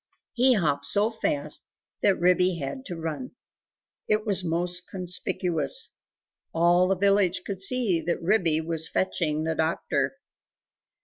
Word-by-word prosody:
He 255 0 +5
hopped 145 -7 0
so 210 +2 +2
fast 285 +6 -2 0.4
that 195 -2 +3
Ribby 180 0 +3
had 160 - -5
to 180 - -5
run. 165 - -5 0.7
It 215 +1 +1
was 200 -3 +2
most 175 +1 -1
conspicuous. 180 -4 -2 0.6
All 175 +2 +4
the 195 - +2
village 195 -1 +2
could 195 -2 -5
see 200 -6 +1
that 170 - -1
Ribby 165 -4 +2
was 160 0 -2
fetching 155 -5 0
the 160 0 0
doctor. 145 -4 -1
180 Hz, 130 wpm, -26 LUFS, 160-200 Hz, 0.7 s, He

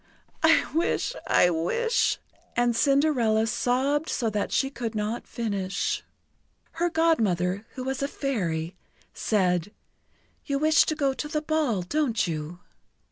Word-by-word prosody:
"I - - +5
wish 335 +9 0
I 180 - +4
wish 455 - +1 0.2
" - - -35
and 240 -1 +2
Cinderella 265 -6 +3
sobbed 260 +6 0
so 230 -4 -1
that 210 -1 -2
she 270 0 +1
could 230 -3 -4
not 215 +2 -3
finish. 200 -5 -2 0.7
Her 345 +1 0
Godmother, 215 - +1
who 255 - -5
was 265 +1 -3
a 280 - +1
Fairy, 180 - -2 0.4
said: 180 -3 0 0.7
"You 280 - -1
wish 310 +2 +4
to 310 - -1
go 280 -3 +1
to 300 - -5
the 305 0 -2
ball, 300 - 0
don't 255 +1 0
you?" 165 +1 -5
240 Hz, 135 wpm, -26 LUFS, 200-295 Hz, 0.7 s, I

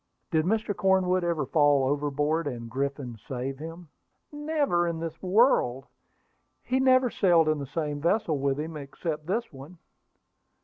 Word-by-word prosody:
"Did 160 -2 +2
Mr. 215 +1 0
Cornwood 185 -1 +2
ever 170 -4 0
fall 145 -1 +3
overboard, 145 +3 0
and 115 -4 -6
Griffin 135 -3 -3
save 135 +1 -4
him?" 165 +1 -9 0.4
"Never 295 - 0
in 165 -1 -3
this 165 0 -6
world! 185 - +3 0.8
He 260 +1 0
never 255 -2 +4
sailed 170 -5 +3
in 155 -1 +1
the 140 - -5
same 150 -1 -3
vessel 170 -3 +1
with 140 0 0
him, 160 +1 -5
except 150 +2 -5
this 230 +3 -2
one." 140 +7 -12
160 Hz, 145 wpm, -27 LUFS, 140-185 Hz, 0.8 s, never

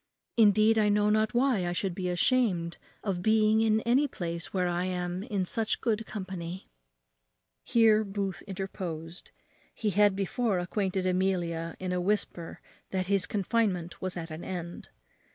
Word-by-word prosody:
Indeed, 215 0 +5
I 210 -1 +3
know 210 0 +3
not 215 +2 +1
why 240 -8 +2
I 175 - -1
should 185 0 -1
be 185 +1 -4
much 180 - 0
ashamed 175 -5 +1 0.3
of 190 -4 -2
being 220 +1 +4
in 220 0 +3
any 255 +6 +3
place 170 -8 -5
where 180 -2 0
I 175 +1 -1
am 180 0 -2
in 200 -4 -2
such 220 +4 -1
good 225 -2 -1
company." 185 -3 -6 1.0
Here 220 -2 +4
Booth 195 -2 -3
interposed. 180 -3 -6 0.5
He 215 -2 -1
had 205 +1 +4
before 200 +2 0
acquainted 185 +1 -1
Amelia 175 -3 0
in 185 -1 -3
a 180 0 0
whisper 180 -3 -2 0.3
that 185 -1 -1
his 195 -1 +1
confinement 195 -4 -1
was 185 -1 -3
at 165 -1 -6
an 155 +2 -7
end. 175 -2 -6
190 Hz, 155 wpm, -29 LUFS, 180-215 Hz, 1.0 s, Indeed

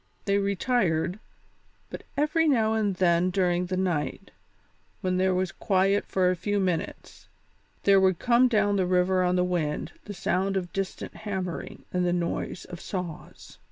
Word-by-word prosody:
They 200 0 +2
retired, 195 -3 0 0.7
but - - -6 0.2
every 305 +3 +2
now 225 -6 +3
and 210 -3 0
then 175 0 +3
during 180 -1 +1
the 185 0 -2
night, 175 -6 -2 0.7
when 185 -1 0
there 185 0 +2
was 185 -1 0
quiet 195 +1 +1
for 180 -1 +2
a - - 0
few 205 +4 -1
minutes, 180 -4 -3 0.6
there 195 -1 +6
would 190 -2 +3
come 245 +4 +4
down 210 -4 +2
the 185 -2 +1
river 185 +1 +2
on 180 0 +2
the 180 - +2
wind 170 -5 -2
the 205 - -7
sound 190 +2 0
of 175 -2 -4
distant 195 -1 -4
hammering 190 -5 -5
and 180 0 +1
the 175 0 +1
noise 175 0 -3
of 175 -2 -9
saws. 180 -5 -7
185 Hz, 160 wpm, -27 LUFS, 180-200 Hz, 0.7 s, there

